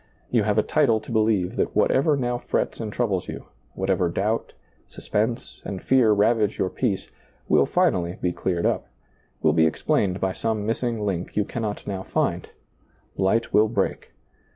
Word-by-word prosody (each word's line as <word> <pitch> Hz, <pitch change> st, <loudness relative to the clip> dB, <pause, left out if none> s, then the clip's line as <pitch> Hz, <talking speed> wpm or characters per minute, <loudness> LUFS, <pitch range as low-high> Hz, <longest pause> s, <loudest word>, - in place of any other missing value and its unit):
You 120 Hz, -, +3 dB
have 105 Hz, 0 st, 0 dB
a 110 Hz, -, +4 dB
title 120 Hz, -8 st, +2 dB
to 110 Hz, -, -11 dB
beheve 110 Hz, -5 st, +1 dB
that -, -, -1 dB
whatever 145 Hz, +2 st, +3 dB
now 120 Hz, -2 st, -1 dB
frets -, -, -2 dB
and 110 Hz, -2 st, -4 dB
troubles 100 Hz, -6 st, -1 dB
you, -, -, -7 dB, 0.3 s
whatever 95 Hz, -2 st, +1 dB
doubt, 105 Hz, +6 st, -1 dB, 0.3 s
suspense, 115 Hz, +3 st, -3 dB
and 95 Hz, -, -5 dB
fear 125 Hz, -2 st, +4 dB
ravage 105 Hz, 0 st, +2 dB
your 95 Hz, -, 0 dB
peace, 105 Hz, -7 st, -2 dB, 0.4 s
will -, -, +4 dB
finally 85 Hz, 0 st, +1 dB
be 90 Hz, -, 0 dB
cleared 85 Hz, -1 st, -1 dB
up, -, -, 0 dB, 0.6 s
will 80 Hz, -, +4 dB
be 80 Hz, 0 st, +4 dB
explained 90 Hz, +4 st, 0 dB
by 95 Hz, -1 st, 0 dB
some 110 Hz, -1 st, -2 dB
missing 115 Hz, -1 st, -1 dB
link 90 Hz, -3 st, -3 dB
you 105 Hz, -, +2 dB
can 115 Hz, -, -5 dB
not 105 Hz, -2 st, -4 dB
now 95 Hz, -2 st, -3 dB
find; -, -, -1 dB, 0.7 s
light 100 Hz, +5 st, +1 dB
will 110 Hz, +1 st, +5 dB
break. 100 Hz, -3 st, -2 dB
105 Hz, 170 wpm, -24 LUFS, 95-115 Hz, 0.7 s, will